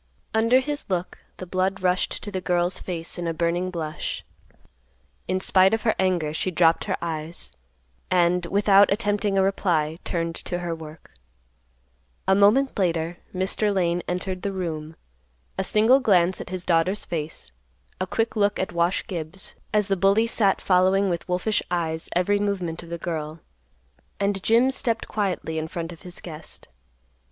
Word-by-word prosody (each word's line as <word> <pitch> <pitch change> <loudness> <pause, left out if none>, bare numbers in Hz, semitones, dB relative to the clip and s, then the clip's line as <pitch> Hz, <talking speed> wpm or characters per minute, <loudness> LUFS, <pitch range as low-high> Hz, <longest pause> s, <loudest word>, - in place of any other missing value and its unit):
Under 230 +4 +4
his 290 +1 -4
look, 180 -1 -2 0.2
the 185 - -6
blood 185 +2 -1
rushed 180 0 0
to 205 - -6
the 190 -2 -3
girl's 175 0 +1
face 170 -1 -4
in 170 - -2
a 165 - -2
burning 175 +2 0
blush. 160 -4 -4 1.0
In 185 +1 0
spite 190 +2 +4
of 225 - -6
her 220 - +3
anger 175 -5 +1
she 170 - -1
dropped 165 -2 +3
her - - -1
eyes, 160 - -4 0.6
and, 175 -1 +2
without 200 +1 +5
attempting 205 -1 +1
a 190 - +4
reply, 170 -5 0
turned 165 -1 -2
to 175 - -4
her 175 -1 -3
work. 160 -1 -10 1.2
A 190 - +5
moment 210 +6 +4
later, 170 -2 0
Mr. 195 +3 0
Lane 175 -3 +1
entered 180 +1 -3
the 200 - -2
room; 160 -4 -4 0.6
a 190 - -1
single 220 +7 +5
glance 185 -7 +3
at - - -8
his 185 -1 -5
daughter's 180 +4 +2
face, 155 - -5 0.5
a 185 - -1
quick 225 +5 -1
look 205 -1 +2
at 190 - -2
Wash 170 +2 +1
Gibbs, 175 +1 -6 0.2
as 210 -2 +2
the 195 - +2
bully 195 +4 +3
sat 210 -4 +2
following 190 +1 +3
with 170 +1 -4
wolfish 185 +4 +1
eyes 165 -2 -2
every 200 +3 +2
movement 185 -5 -2
of 170 - -12
the 170 - -4
girl, 160 -2 -4 0.8
and 200 -1 0
Jim 235 +6 +4
stepped 230 -3 -1
quietly 185 -6 -2
in 160 - -3
front 165 +1 -5
of 165 - -12
his 180 -2 -9
guest. 160 - -9
185 Hz, 165 wpm, -24 LUFS, 170-200 Hz, 1.2 s, without